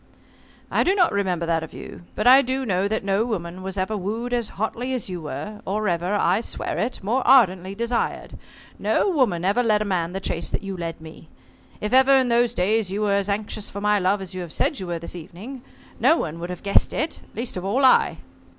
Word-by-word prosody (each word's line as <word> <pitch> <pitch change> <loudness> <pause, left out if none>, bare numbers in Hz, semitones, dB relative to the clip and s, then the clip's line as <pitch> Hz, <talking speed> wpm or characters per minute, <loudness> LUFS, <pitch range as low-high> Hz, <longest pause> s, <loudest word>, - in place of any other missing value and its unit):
"I - - +3
do 380 - +2
not 360 -4 +4
remember 185 -4 0
that 165 -1 +1
of 160 - -8
you. 175 - -10
But 215 - -2
I 260 +2 +8
do 265 +1 -2
know 195 -2 +1
that 220 0 -2
no 195 +2 +1
woman 185 -6 -4
was 190 +1 -5
ever 190 +3 -1
wooed 220 +5 -3
as 235 -3 0
hotly 240 +5 -2
as 240 - -4
you 175 -2 -5
were 210 +7 -6
or 210 +2 -1
ever 175 +3 0
I 195 +1 +2
swear - - -4
it 225 -2 -3
more 235 +7 +1
ardently 195 -7 +4
desired. 235 +2 -2 0.4
No 400 - +1
woman 215 - +1
ever 205 +6 +3
led 215 -3 +3
a 210 - -2
man 180 -3 -1
the 195 - -2
chase 170 -3 -3
you 195 -1 -6
led 165 -2 -5
me. 160 0 -12 0.5
If 210 +3 -2
ever 265 +1 +6
in 260 -2 +3
those 240 0 +2
days 205 +1 +1
you 205 +2 -1
were 205 -1 +2
as 200 0 0
anxious 210 +1 -3
for 200 - -6
my 210 0 +2
love 195 +1 +1
as 190 0 -8
you 185 - -5
have 175 -3 -7
said 290 - 0
you 185 - -5
were 170 -1 -2
this 170 +2 -8
evening, 200 - -9 0.4
no 325 - +5
one 165 - -4
would 175 +1 -5
have 180 - -7
guessed 200 -1 +3
it, 315 +2 -2
least 235 +2 -3
of 180 - -4
all 250 +8 +2
I." 255 - +4
200 Hz, 230 wpm, -23 LUFS, 180-235 Hz, 0.5 s, I